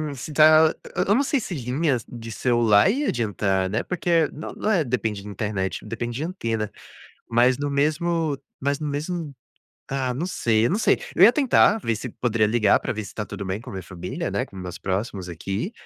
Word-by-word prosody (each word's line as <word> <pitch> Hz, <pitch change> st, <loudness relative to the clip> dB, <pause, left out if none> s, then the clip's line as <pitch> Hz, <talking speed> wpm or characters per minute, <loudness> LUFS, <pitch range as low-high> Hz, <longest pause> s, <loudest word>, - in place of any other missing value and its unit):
se 135 Hz, +4 st, -7 dB
tá 155 Hz, +1 st, +6 dB, 0.2 s
eu -, -, +2 dB
eu 205 Hz, -, +4 dB
não 275 Hz, -, +3 dB
sei 280 Hz, 0 st, +1 dB
se 195 Hz, -6 st, -5 dB
linhas 130 Hz, -1 st, -1 dB
de 115 Hz, -1 st, -8 dB
celular 120 Hz, -, +3 dB
ia 275 Hz, +7 st, 0 dB
adiantar, 100 Hz, -5 st, 0 dB
né, 110 Hz, +4 st, 0 dB
porque 170 Hz, -3 st, +1 dB
no 155 Hz, -, -7 dB
não -, -, -2 dB
é 180 Hz, -6 st, +3 dB
depende 110 Hz, -6 st, -2 dB
de -, -, -10 dB
internet, 100 Hz, -2 st, -3 dB
depende 115 Hz, +2 st, -4 dB
de 145 Hz, -, -3 dB
antena. 115 Hz, -, -3 dB, 0.6 s
Mas 120 Hz, +2 st, +4 dB
no 145 Hz, 0 st, -1 dB
mesmo 155 Hz, +2 st, 0 dB, 0.2 s
mas 140 Hz, +1 st, 0 dB
no 155 Hz, -, -3 dB
mesmo, 150 Hz, +1 st, -4 dB, 0.5 s
ah, 130 Hz, -2 st, -1 dB
não 145 Hz, +8 st, -2 dB
sei, 115 Hz, -11 st, +1 dB
eu -, -, +2 dB
não 200 Hz, -, +1 dB
sei. -, -, +3 dB, 0.2 s
Eu -, -, +6 dB
ia 230 Hz, -, +9 dB
tentar 255 Hz, -6 st, +4 dB
ver 115 Hz, -, -1 dB
se 125 Hz, +4 st, -6 dB
poderia 115 Hz, -2 st, +1 dB
ligar 110 Hz, -2 st, +3 dB
pra -, -, -3 dB
ver 110 Hz, -1 st, -5 dB
se -, -, -11 dB
tá 105 Hz, -, -3 dB
tudo 100 Hz, -1 st, -6 dB
bem 95 Hz, +3 st, -3 dB
com -, -, -10 dB
a -, -, -8 dB
minha 95 Hz, -1 st, -5 dB
família, 90 Hz, +1 st, -5 dB
né, -, -, 0 dB
com -, -, -17 dB
meus 90 Hz, -2 st, -6 dB
próximos 95 Hz, -1 st, -3 dB
aqui. 95 Hz, -, -4 dB
120 Hz, 215 wpm, -24 LUFS, 105-155 Hz, 0.6 s, ia